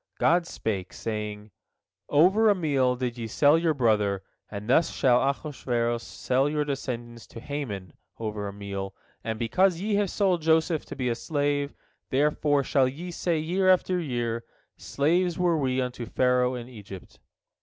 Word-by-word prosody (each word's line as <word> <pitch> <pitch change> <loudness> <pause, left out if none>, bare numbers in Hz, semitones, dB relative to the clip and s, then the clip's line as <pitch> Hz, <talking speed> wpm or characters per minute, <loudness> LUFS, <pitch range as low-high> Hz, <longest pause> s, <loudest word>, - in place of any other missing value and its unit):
God 170 +1 +3
spake, 100 - -3
saying: 105 -1 -5 0.6
"Over 190 +9 +5
a 205 - +4
meal 140 -7 +1
did 125 -1 -3
ye 115 - -3
sell 145 +6 +4
your 165 -1 +2
brother, 105 -6 +1 0.3
and 105 0 -7
thus 135 +7 +4
shall 125 -2 +3
Ahasuerus 125 -5 -1
sell 130 +3 0
your 150 0 0
descendants 120 -4 -5
to - - -10
Haman 115 - -5 0.2
over 105 -2 -4
a - - -4
meal, 100 -1 -6 0.3
and 110 0 -3
because 175 - +2
ye 210 +3 -1
have 205 -2 +1
sold 185 -4 +1
Joseph 160 0 +2
to - - -8
be 130 -2 -2
a - - +1
slave, 145 +2 -1 0.3
therefore 145 +1 +2
shall 135 -1 +3
ye 165 +7 -6
say 170 -1 -1
year 180 +5 +1
after 185 0 +3
year, 120 -6 -2 0.3
Slaves 170 +4 0
were 175 -2 +2
we 130 -2 0
unto 125 -2 -3
Pharaoh 125 +1 +2
in 120 -1 -6
Egypt." 100 -6 -11
130 Hz, 160 wpm, -27 LUFS, 115-160 Hz, 0.6 s, Over